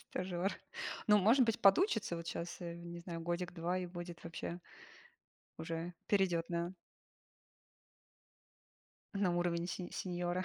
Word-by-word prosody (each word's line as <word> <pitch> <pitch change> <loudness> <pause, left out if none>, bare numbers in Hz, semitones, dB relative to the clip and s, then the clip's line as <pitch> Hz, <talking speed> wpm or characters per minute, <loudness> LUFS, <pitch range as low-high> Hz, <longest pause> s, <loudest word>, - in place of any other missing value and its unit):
Стажёр. 180 +1 -1 0.5
Ну, 210 -1 +7
может 230 +6 +6
быть, 225 -2 +1
подучится 205 - +5
вот 170 0 -6
щас, 170 +1 -3
э, 170 -1 -4
не 170 0 -7
знаю, 170 -1 -5
годик-два 175 +1 -1
и 180 - -2
будет 175 -1 -7
вообще 170 +1 -4 1.0
уже 165 +2 -3
перейдет 180 -5 +2
на 170 +2 -1 2.4
на 190 -3 +2
уровень 175 -1 +1
сень 180 0 -4
сеньора. 180 0 -1
175 Hz, 120 wpm, -36 LUFS, 170-185 Hz, 2.4 s, Ну